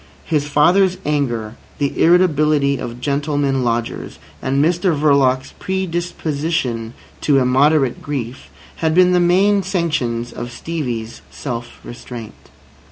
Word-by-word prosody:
His 150 Hz, -4 st, 0 dB
father's 180 Hz, +6 st, +3 dB
anger, 120 Hz, -7 st, -1 dB, 0.2 s
the 140 Hz, -2 st, -1 dB
irritability 150 Hz, -5 st, +3 dB
of 120 Hz, 0 st, -6 dB
gentlemen 140 Hz, -1 st, 0 dB
lodgers, 115 Hz, -1 st, -2 dB, 0.2 s
and 130 Hz, +1 st, -1 dB
Mr 175 Hz, +2 st, +2 dB
Verloc's 135 Hz, -3 st, +2 dB
predisposition 165 Hz, -9 st, -2 dB, 0.3 s
to 145 Hz, -2 st, +3 dB
immoderate 135 Hz, +1 st, +3 dB
grief, 130 Hz, -3 st, -5 dB, 0.3 s
had 160 Hz, -1 st, 0 dB
been 180 Hz, 0 st, +5 dB
the 180 Hz, -, +4 dB
main 195 Hz, +4 st, +3 dB
sanctions 155 Hz, -, -2 dB
of 120 Hz, 0 st, -6 dB
Stevie's 120 Hz, -7 st, -5 dB
self 120 Hz, -3 st, -6 dB
restraint. 120 Hz, -2 st, -9 dB
145 Hz, 110 wpm, -19 LUFS, 125-170 Hz, 0.3 s, been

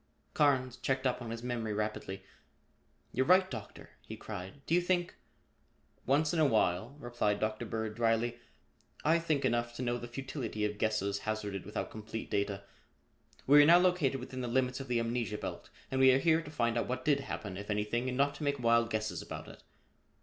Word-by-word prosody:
Carnes 130 Hz, -4 st, +2 dB
checked 130 Hz, 0 st, -1 dB
up 125 Hz, 0 st, +1 dB
on 120 Hz, -, -6 dB
his 115 Hz, +1 st, -5 dB
memory 115 Hz, -3 st, -2 dB
rapidly. 105 Hz, -2 st, -3 dB, 0.9 s
"You're 130 Hz, +1 st, +1 dB
right, 185 Hz, +1 st, +6 dB
Doctor," 110 Hz, -5 st, -8 dB
he -, -, -9 dB
cried. 100 Hz, +6 st, -8 dB
"Do -, -, -1 dB
you 175 Hz, -, +5 dB
think 175 Hz, 0 st, 0 dB, 0.5 s
?" -, -, -39 dB
"Once 150 Hz, +5 st, +3 dB
in 165 Hz, -, +1 dB
a 155 Hz, -, +5 dB
while," 110 Hz, +1 st, +1 dB
replied 120 Hz, -6 st, -1 dB
Dr. 110 Hz, +2 st, -2 dB
Bird 110 Hz, 0 st, -3 dB
dryly, 115 Hz, +1 st, +1 dB, 0.7 s
"I 165 Hz, +2 st, +4 dB
think 155 Hz, -4 st, 0 dB
enough 120 Hz, 0 st, 0 dB
to 130 Hz, -, -4 dB
know 120 Hz, 0 st, -1 dB
the 120 Hz, -, -7 dB
futility 120 Hz, -4 st, -4 dB
of 105 Hz, 0 st, -3 dB
guesses 100 Hz, -2 st, 0 dB
hazarded 105 Hz, -3 st, -3 dB
without 105 Hz, -, -4 dB
complete 110 Hz, +1 st, -7 dB
data. 100 Hz, 0 st, -1 dB, 0.8 s
We 145 Hz, +2 st, +8 dB
are -, -, +7 dB
now 170 Hz, +2 st, +9 dB
located 175 Hz, -7 st, +2 dB
within 130 Hz, +1 st, -6 dB
the 125 Hz, -, -2 dB
limits 125 Hz, +2 st, 0 dB
of 135 Hz, -, -6 dB
the 120 Hz, -1 st, +1 dB
amnesia 115 Hz, -2 st, -1 dB
belt -, -, -6 dB, 0.2 s
and 130 Hz, 0 st, +1 dB
we 130 Hz, 0 st, +8 dB
are -, -, +5 dB
here 160 Hz, +3 st, +3 dB
to 150 Hz, -, -10 dB
find 120 Hz, -5 st, 0 dB
out -, -, -2 dB
what 130 Hz, +1 st, -3 dB
did 145 Hz, -2 st, +3 dB
happen, 105 Hz, -8 st, -5 dB
if 100 Hz, +2 st, -7 dB
anything, 105 Hz, +4 st, 0 dB
and 125 Hz, -, -3 dB
not 140 Hz, +1 st, +3 dB
to 155 Hz, -, -7 dB
make 140 Hz, -1 st, +1 dB
wild 115 Hz, -1 st, +3 dB
guesses 110 Hz, -1 st, -2 dB
about -, -, -7 dB
it. -, -, -12 dB
120 Hz, 200 wpm, -32 LUFS, 110-135 Hz, 0.9 s, now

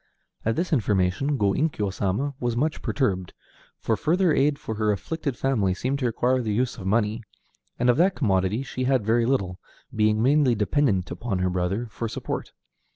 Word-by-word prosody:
At 115 Hz, 0 st, 0 dB
this 170 Hz, +3 st, -1 dB
information 105 Hz, +3 st, +1 dB
Go 100 Hz, -4 st, +2 dB
Inkyo 105 Hz, -, -1 dB
Sama 105 Hz, +10 st, -1 dB
was 120 Hz, -1 st, -1 dB
much 155 Hz, +5 st, 0 dB
perturbed, 95 Hz, -10 st, -1 dB, 0.4 s
for -, -, 0 dB
further 175 Hz, +1 st, +2 dB
aid 140 Hz, +1 st, +2 dB
for 110 Hz, -, -5 dB
her 105 Hz, 0 st, +1 dB
afflicted 140 Hz, -, -3 dB
family 105 Hz, -9 st, +1 dB
seemed 130 Hz, +7 st, -2 dB
to 125 Hz, -, +1 dB
require 125 Hz, +2 st, +1 dB
the 110 Hz, -3 st, -2 dB
use 125 Hz, +1 st, -1 dB
of 95 Hz, -, -5 dB
money, 110 Hz, +2 st, +1 dB, 0.6 s
and 125 Hz, -, +1 dB
of 125 Hz, -, +4 dB
that 185 Hz, +4 st, +3 dB
commodity 100 Hz, 0 st, +1 dB
she 130 Hz, -1 st, -4 dB
had 130 Hz, -5 st, +2 dB
very 115 Hz, +1 st, +2 dB
little, 95 Hz, -9 st, 0 dB, 0.4 s
being 110 Hz, 0 st, +2 dB
mainly 135 Hz, +1 st, +3 dB
dependent 105 Hz, -3 st, +1 dB
upon 115 Hz, -5 st, -3 dB
her 90 Hz, 0 st, 0 dB
brother 90 Hz, +6 st, -1 dB
for 115 Hz, -, -4 dB
support. -, -, -5 dB
115 Hz, 180 wpm, -25 LUFS, 100-135 Hz, 0.6 s, of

